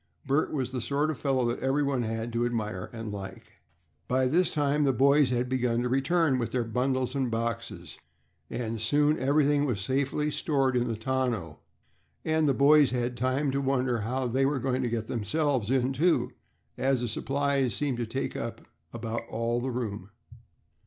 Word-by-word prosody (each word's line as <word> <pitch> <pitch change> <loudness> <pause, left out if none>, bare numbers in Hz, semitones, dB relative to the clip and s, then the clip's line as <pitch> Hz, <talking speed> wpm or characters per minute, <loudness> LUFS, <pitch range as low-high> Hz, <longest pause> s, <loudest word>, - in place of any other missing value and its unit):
Bert 140 +3 +1
was 130 -4 -2
the 130 -2 -3
sort 145 +5 0
of 150 - -7
fellow 135 -3 +1
that 120 +1 -1
everyone 135 -1 +1
had 115 0 -3
to 120 0 +1
admire 110 -6 -2
and 115 -2 -6
like. 100 -1 -9 0.5
By 130 +1 +2
this 165 +7 +3
time 145 0 +1
the 140 - +3
boys 140 +2 +4
had 125 0 0
begun 125 -2 0
to 125 - -1
return 135 +1 +2
with 115 - -2
their 125 -2 0
bundles 130 +2 -1
and 135 -3 0
boxes, 115 -8 -4 0.5
and 115 -2 -3
soon 150 +6 +2
everything 145 +1 +3
was 120 -8 -1
safely 135 +6 0
stored 135 -4 +1
in 120 0 +1
the 115 - -2
tonneau, 115 - -2 0.7
and 155 -1 +2
the 135 - +2
boys 145 +1 +6
had 125 -1 -1
time 130 +4 0
to 140 +1 -1
wonder 130 -3 +1
how 125 +5 -2
they 130 +3 +1
were 140 +1 +2
going 130 0 -1
to 125 - -1
get 115 -1 -2
themselves 125 +1 -1
in 130 0 +1
too, 165 +6 +2 0.5
as 135 -2 +2
the 120 - -1
supplies 135 0 0
seemed 140 -5 -1
to 120 - -2
take 130 +5 -3
up 115 0 -5 0.3
about 115 0 -4
all 115 +1 -1
the 130 - -2
room. 105 -6 -4
130 Hz, 180 wpm, -28 LUFS, 115-140 Hz, 0.7 s, boys